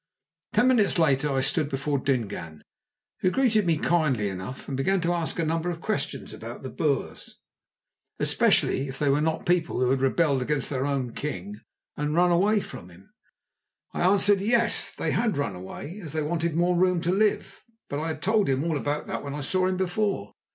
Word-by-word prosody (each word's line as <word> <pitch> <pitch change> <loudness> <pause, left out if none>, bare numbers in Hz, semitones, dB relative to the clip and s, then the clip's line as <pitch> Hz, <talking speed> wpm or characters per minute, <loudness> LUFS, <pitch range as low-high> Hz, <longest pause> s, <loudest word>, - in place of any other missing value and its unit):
Ten 225 +4 +4
minutes 220 -8 +3
later 150 -3 +2
I 135 -1 +1
stood 140 +2 +1
before 140 0 -1
Dingaan, 100 - -3 0.6
who 185 - +2
greeted 220 -4 +2
me 165 -2 +3
kindly 150 -11 +1
enough, 95 +7 -7
and 135 - -3
began 190 +9 +1
to 170 +1 +1
ask 170 -2 -2
a 165 - 0
number 165 +2 -1
of 170 -2 -4
questions 150 -8 -3
about 115 +3 -8
the 130 - -6
Boers, 140 +2 -2 0.8
especially 135 - +2
if 135 0 -6
they 145 0 +1
were 140 +2 +3
not 160 +1 -1
people 175 -5 +1
who 125 0 +2
had 135 -1 +1
rebelled 135 0 +2
against 135 +1 -1
their 135 0 -1
own 130 -4 -2
king 200 +7 -5 0.4
and 150 +1 -2
run 175 +1 +4
away 200 +5 +3
from 90 - -9
him. 90 +2 -18 0.8
I - - -3
answered, 195 +2 +4
Yes, 230 +2 +2
they 160 - -2
had 215 -3 0
run 115 -9 -2
away, 140 - -8
as 160 -8 -6
they 155 -1 -1
wanted 165 +1 -1
more 175 +1 +2
room 180 0 +3
to 170 - 0
live; 210 +2 0 0.3
but 145 - -3
I 160 - -2
had 155 -2 -5
told 215 +1 +2
him 135 +1 +1
all 165 -2 0
about 145 +2 -2
that - - -4
when 140 0 -6
I 150 - -4
saw 185 +7 +1
him 185 0 -1
before. 185 - -1
155 Hz, 200 wpm, -26 LUFS, 135-185 Hz, 0.8 s, Ten